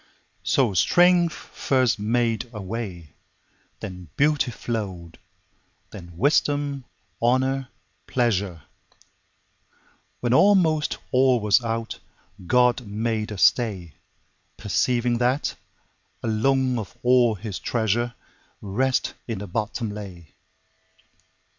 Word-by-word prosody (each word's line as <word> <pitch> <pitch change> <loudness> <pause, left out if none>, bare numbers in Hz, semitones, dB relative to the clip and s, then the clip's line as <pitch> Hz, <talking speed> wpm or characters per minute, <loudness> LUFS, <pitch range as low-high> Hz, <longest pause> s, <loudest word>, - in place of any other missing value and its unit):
So 100 +5 +2
strength 175 - +4
first 130 -5 0
made 115 +1 0
a 110 - -7
way, 95 - -6 0.7
Then 90 -5 -8
beauty 145 -2 +2
flow'd, 100 -8 -5 0.7
then 85 -4 -11
wisdom, 145 - +1 0.4
honour, 130 +2 +1 0.4
pleasure; 100 - 0 1.6
When 120 -1 0
almost 160 -3 +4
all 130 -1 +4
was 105 +3 +3
out, 115 0 -3 0.5
God 125 0 +3
made 110 +1 -2
a 105 - -5
stay, 95 - +2 0.6
Perceiving 120 -1 0
that, 125 +3 +1 0.7
alone 125 +3 +1
of 105 - -8
all 125 -2 +4
His 105 -1 -6
treasure, 120 +1 -1 0.4
Rest 125 +6 0
in 115 -3 -3
the 100 - -6
bottom 110 +3 -3
lay. 95 -7 -9
115 Hz, 95 wpm, -24 LUFS, 105-130 Hz, 1.6 s, strength